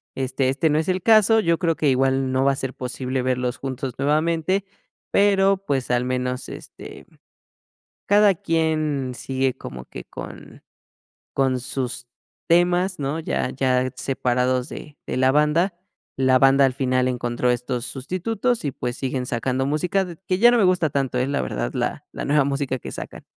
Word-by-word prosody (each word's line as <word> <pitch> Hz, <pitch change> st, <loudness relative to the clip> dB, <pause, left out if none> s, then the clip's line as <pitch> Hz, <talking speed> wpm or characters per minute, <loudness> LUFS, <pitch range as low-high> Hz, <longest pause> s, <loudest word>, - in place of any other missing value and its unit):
Este 130 Hz, 0 st, 0 dB
este 155 Hz, +4 st, +1 dB
no 150 Hz, -, +2 dB
es 160 Hz, -, -2 dB
el 185 Hz, 0 st, 0 dB
caso, 225 Hz, 0 st, +5 dB
yo 170 Hz, -3 st, +2 dB
creo 165 Hz, -3 st, +1 dB
que 150 Hz, -, +1 dB
igual 135 Hz, 0 st, +1 dB
no 130 Hz, 0 st, +1 dB
va 140 Hz, -, +4 dB
a -, -, -3 dB
ser 135 Hz, -1 st, -3 dB
posible 130 Hz, 0 st, -3 dB
verlos 125 Hz, 0 st, -1 dB
juntos 135 Hz, -1 st, -4 dB
nuevamente, 165 Hz, +6 st, +1 dB, 0.5 s
pero, 195 Hz, -1 st, +4 dB
pues, 135 Hz, -5 st, -1 dB
al 125 Hz, 0 st, +1 dB
menos, 125 Hz, 0 st, -2 dB
este, -, -, -10 dB, 1.0 s
cada 205 Hz, -1 st, +5 dB
quien 155 Hz, -7 st, 0 dB
sigue 130 Hz, 0 st, -1 dB
como 65 Hz, 0 st, -8 dB
que -, -, -9 dB
con -, -, -10 dB, 0.7 s
con 130 Hz, -2 st, +1 dB
sus 125 Hz, -1 st, -4 dB, 0.4 s
temas, 175 Hz, +2 st, +3 dB
¿no?, 145 Hz, +3 st, -2 dB
ya 160 Hz, -, -2 dB
ya 130 Hz, -1 st, +1 dB
separados 125 Hz, 0 st, 0 dB
de 150 Hz, -2 st, -9 dB
de -, -, -3 dB
la 130 Hz, 0 st, +4 dB
banda. 150 Hz, +6 st, +2 dB, 0.4 s
La 130 Hz, -1 st, +4 dB
banda 135 Hz, +1 st, +5 dB
al 130 Hz, -, +1 dB
final 130 Hz, -2 st, +1 dB
encontró 125 Hz, 0 st, 0 dB
estos 125 Hz, 0 st, -2 dB
sustitutos 195 Hz, -, -2 dB
y, 140 Hz, -, 0 dB
pues, 125 Hz, -1 st, -4 dB
siguen 130 Hz, -1 st, -3 dB
sacando 130 Hz, +2 st, -1 dB
música 180 Hz, +6 st, +1 dB
d 175 Hz, -3 st, -8 dB
que 185 Hz, 0 st, 0 dB
ya 240 Hz, +3 st, +8 dB
no 240 Hz, -, +4 dB
me 220 Hz, -, +4 dB
gusta 180 Hz, -4 st, +3 dB
tanto, 135 Hz, -3 st, -1 dB
eh, 125 Hz, -, 0 dB
la 140 Hz, 0 st, 0 dB
verdad -, -, -3 dB
la -, -, -2 dB
la -, -, -5 dB
nueva 145 Hz, 0 st, +3 dB
música 140 Hz, -1 st, -2 dB
que -, -, -8 dB
sacan. -, -, -8 dB
135 Hz, 175 wpm, -23 LUFS, 130-165 Hz, 1.0 s, ya